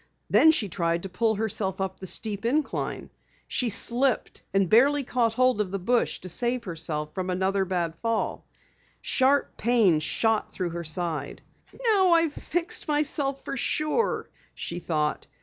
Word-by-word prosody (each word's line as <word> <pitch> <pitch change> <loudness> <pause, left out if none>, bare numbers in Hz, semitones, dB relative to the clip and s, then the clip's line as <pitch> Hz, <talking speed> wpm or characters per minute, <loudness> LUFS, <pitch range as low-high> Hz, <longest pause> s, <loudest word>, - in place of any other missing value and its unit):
Then 320 - +6
she 275 -10 +2
tried 170 -2 -1
to 195 - -5
pull 220 +4 0
herself 200 -3 -2
up 190 -1 -3
the 190 - -7
steep 205 +1 0
incline. 280 +6 -2 0.4
She 250 - 0
slipped 240 +4 +1
and 195 -1 +2
barely 275 +8 +4
caught 235 -3 0
hold 255 -3 +3
of 200 - -2
the 195 - -3
bush 235 +6 0
to 185 - -7
save 240 +6 0
herself 160 -3 -2
from 185 -1 -3
another 190 +1 0
bad 175 -3 -1
fall. 230 -1 -1 0.6
Sharp 275 +2 +1
pains 215 -9 +3
shot 225 +7 0
through 180 -3 -3
her 170 0 -5
side. 155 -3 -2 0.4
"Now 385 -6 +4
I've 330 -3 +3
fixed 340 +3 -2
myself 290 -2 0
for - - -4
sure," 305 - 0 0.3
she - - -5
thought. 155 -3 -2
215 Hz, 155 wpm, -26 LUFS, 180-260 Hz, 0.6 s, Then